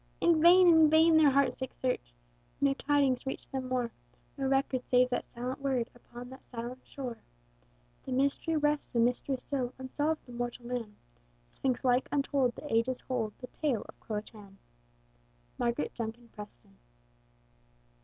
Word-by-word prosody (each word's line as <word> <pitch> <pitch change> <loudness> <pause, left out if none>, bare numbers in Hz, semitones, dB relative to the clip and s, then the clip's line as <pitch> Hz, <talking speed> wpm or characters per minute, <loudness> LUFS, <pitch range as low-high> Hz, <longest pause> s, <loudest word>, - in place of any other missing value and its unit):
In 335 -2 +4
vain, 360 +2 +8
in 320 -2 +7
vain, 320 +1 +6
their 315 -2 +7
heart 275 -2 +3
sick 260 0 -6
search! 250 - -3 0.4
No 280 -1 +3
tidings 280 -2 +1
reached 265 - -5
them 260 -1 -3
more; 250 -2 -1 0.4
No 270 -1 -2
record 270 -1 +1
save 250 0 +3
that 245 - -1
silent 250 +3 -5
word 260 -4 -1
Upon 245 +1 -11
that 265 - -13
silent 245 +1 -6
shore. 255 -4 -7 0.9
The - - -4
mystery 280 +5 +1
rests 295 -3 0
a - - +3
mystery 245 +3 +1
still, 255 -1 -3
Unsolved 290 +4 -2
of 245 - -10
mortal 240 0 -4
man: 235 -4 -4 0.5
Sphinx 260 - -2
like 250 +1 +3
untold, 275 -3 +1
the 295 - -6
ages 235 +3 +1
hold 230 -5 -2
The - - -8
tale 270 -9 -1
of - - -14
CRO 215 - -5
A - - -1
TÀN! 205 -3 -13 1.0
MARGARET 235 0 -1
JUNKIN 235 +1 -6
PRESTON. 120 - -13
255 Hz, 160 wpm, -31 LUFS, 240-280 Hz, 1.0 s, vain